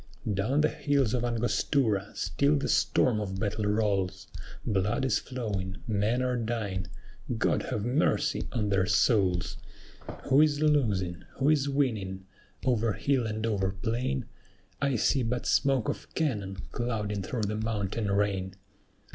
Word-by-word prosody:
"Down 110 Hz, +10 st, +1 dB
the 155 Hz, -, +4 dB
hills 140 Hz, -7 st, +1 dB
of 125 Hz, -2 st, 0 dB
Angostura 115 Hz, -2 st, +1 dB
still 140 Hz, +2 st, +1 dB
the 140 Hz, -, -1 dB
storm 115 Hz, -4 st, +2 dB
of 95 Hz, -2 st, -4 dB
battle 105 Hz, 0 st, -1 dB
rolls; 100 Hz, -3 st, 0 dB, 0.4 s
Blood 105 Hz, +4 st, +1 dB
is 135 Hz, -, +2 dB
flowing, 100 Hz, -7 st, -4 dB
men 110 Hz, +4 st, +1 dB
are 125 Hz, -1 st, 0 dB
dying; 110 Hz, -6 st, -2 dB, 0.5 s
God -, -, +1 dB
have 105 Hz, 0 st, -2 dB
mercy 150 Hz, +3 st, +1 dB
on 110 Hz, -4 st, -1 dB
their 95 Hz, -2 st, +2 dB
souls!" 90 Hz, -7 st, +2 dB, 0.7 s
Who 135 Hz, +2 st, +5 dB
is 150 Hz, -2 st, +3 dB
losing? 105 Hz, -, +1 dB
who 135 Hz, +2 st, +2 dB
is 145 Hz, -2 st, +3 dB
winning? 105 Hz, -9 st, -1 dB, 0.4 s
"Over 115 Hz, -4 st, +2 dB
hill 130 Hz, -2 st, +1 dB
and 110 Hz, +1 st, -2 dB
over 100 Hz, -4 st, 0 dB
plain, 110 Hz, -, -2 dB, 0.6 s
I 140 Hz, -2 st, +2 dB
see 130 Hz, +4 st, +2 dB
but 120 Hz, +1 st, -2 dB
smoke 135 Hz, -5 st, +2 dB
of -, -, -4 dB
cannon 105 Hz, -, -1 dB
clouding 105 Hz, -4 st, -2 dB
through 110 Hz, +4 st, -3 dB
the 105 Hz, +1 st, -1 dB
mountain 110 Hz, -1 st, -2 dB
rain." 100 Hz, -2 st, 0 dB
110 Hz, 140 wpm, -29 LUFS, 100-130 Hz, 0.7 s, Who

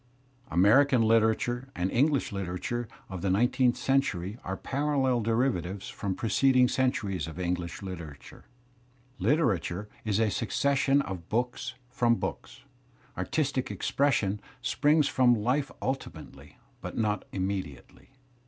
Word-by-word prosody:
American 115 Hz, -, +5 dB
literature 115 Hz, +3 st, +2 dB
and 90 Hz, +2 st, -1 dB
English 140 Hz, +2 st, +2 dB
Uterature 100 Hz, +5 st, -3 dB, 0.2 s
of 95 Hz, -3 st, -6 dB
the 95 Hz, -, 0 dB
nine 115 Hz, +7 st, +3 dB
teenth 125 Hz, -2 st, +2 dB
century 110 Hz, -6 st, 0 dB
are 95 Hz, +1 st, -4 dB
parallel 135 Hz, -3 st, 0 dB
derivatives 110 Hz, -5 st, -1 dB
from 95 Hz, -2 st, -3 dB
preceding 125 Hz, +3 st, +3 dB
cen 130 Hz, +1 st, +2 dB
turies 95 Hz, -10 st, -3 dB
of 80 Hz, +2 st, -8 dB
English 90 Hz, -1 st, -3 dB
Kteratiu^. 85 Hz, -8 st, -9 dB, 0.8 s
Literatu 105 Hz, -, +1 dB, 0.2 s
re 110 Hz, -, -2 dB
_is_^ 110 Hz, +3 st, +3 dB, 0.8 s
_guggg§g^QQ 95 Hz, -3 st, -5 dB
books 125 Hz, +2 st, -2 dB, 0.2 s
from 120 Hz, -1 st, +3 dB
bo -, -, -1 dB
oks. -, -, -14 dB, 0.5 s
Artistic 140 Hz, -4 st, -1 dB
expression 110 Hz, -8 st, 0 dB, 0.2 s
springs 150 Hz, +4 st, +3 dB
from 125 Hz, -2 st, +4 dB
life 125 Hz, +6 st, 0 dB
ultimately 135 Hz, 0 st, -6 dB, 0.2 s
but -, -, -6 dB
not 105 Hz, -3 st, 0 dB
immediately. 95 Hz, -7 st, -5 dB
115 Hz, 120 wpm, -28 LUFS, 95-130 Hz, 0.8 s, American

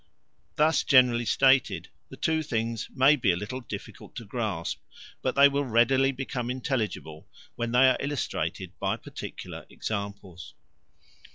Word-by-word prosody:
Thus 155 Hz, -1 st, +3 dB
generally 125 Hz, -3 st, +4 dB
stated 135 Hz, +2 st, +3 dB, 0.2 s
the -, -, -11 dB
two 160 Hz, 0 st, +1 dB
things 115 Hz, -5 st, -3 dB
may 135 Hz, +3 st, +5 dB
be 115 Hz, -9 st, +2 dB
a -, -, 0 dB
little 105 Hz, +8 st, -5 dB
difficult 120 Hz, -, -9 dB
to 115 Hz, -, -7 dB
grasp, 100 Hz, -6 st, -3 dB, 0.4 s
but -, -, -1 dB
they 140 Hz, 0 st, +8 dB
will 140 Hz, 0 st, 0 dB
readily 130 Hz, +2 st, +3 dB
become 125 Hz, -2 st, -4 dB
intelligible 120 Hz, -, -3 dB, 0.3 s
when 120 Hz, 0 st, -3 dB
they 125 Hz, +2 st, +6 dB
are 130 Hz, -, +3 dB
illustrated 140 Hz, 0 st, -3 dB
by -, -, -1 dB
particular -, -, -8 dB
examples. 100 Hz, -4 st, -6 dB
125 Hz, 140 wpm, -27 LUFS, 110-135 Hz, 0.4 s, they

